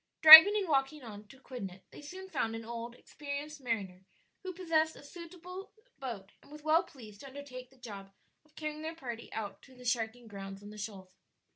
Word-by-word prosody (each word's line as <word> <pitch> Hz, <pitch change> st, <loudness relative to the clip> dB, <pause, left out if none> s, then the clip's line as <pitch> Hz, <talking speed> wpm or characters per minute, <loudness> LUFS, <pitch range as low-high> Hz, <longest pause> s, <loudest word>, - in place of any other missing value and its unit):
Driving 320 Hz, +6 st, +13 dB
and 395 Hz, -3 st, -2 dB
walking 275 Hz, -1 st, -1 dB
on 210 Hz, -2 st, -11 dB
to 265 Hz, +5 st, -17 dB
Quidnet 195 Hz, -9 st, -9 dB
they -, -, -13 dB
soon 370 Hz, +6 st, -10 dB
found 225 Hz, -11 st, -3 dB
an 225 Hz, 0 st, -8 dB
old, 235 Hz, +1 st, -7 dB
experienced 290 Hz, +2 st, -8 dB
mariner 200 Hz, -7 st, -4 dB, 0.4 s
who 375 Hz, -, -6 dB
possessed 325 Hz, -3 st, 0 dB
a -, -, -14 dB
suitable 355 Hz, +4 st, -11 dB, 0.3 s
boat 225 Hz, -8 st, -7 dB
and -, -, -21 dB
was 300 Hz, 0 st, -12 dB
well 315 Hz, +2 st, +3 dB
pleased 215 Hz, -7 st, -14 dB
to 275 Hz, -, -11 dB
undertake 260 Hz, -2 st, -10 dB
the 265 Hz, -, -24 dB
job 200 Hz, -6 st, -10 dB, 0.3 s
of 305 Hz, 0 st, -31 dB
carrying 305 Hz, 0 st, -6 dB
their 320 Hz, +1 st, -6 dB
party 240 Hz, -7 st, -8 dB
out 215 Hz, -2 st, -6 dB
to 260 Hz, -, -19 dB
the 250 Hz, 0 st, -15 dB
sharking 235 Hz, 0 st, -2 dB
grounds 195 Hz, -1 st, -9 dB
on 205 Hz, -, -11 dB
the 215 Hz, -, -12 dB
shoals. 195 Hz, -3 st, -8 dB
260 Hz, 195 wpm, -31 LUFS, 220-310 Hz, 0.4 s, Driving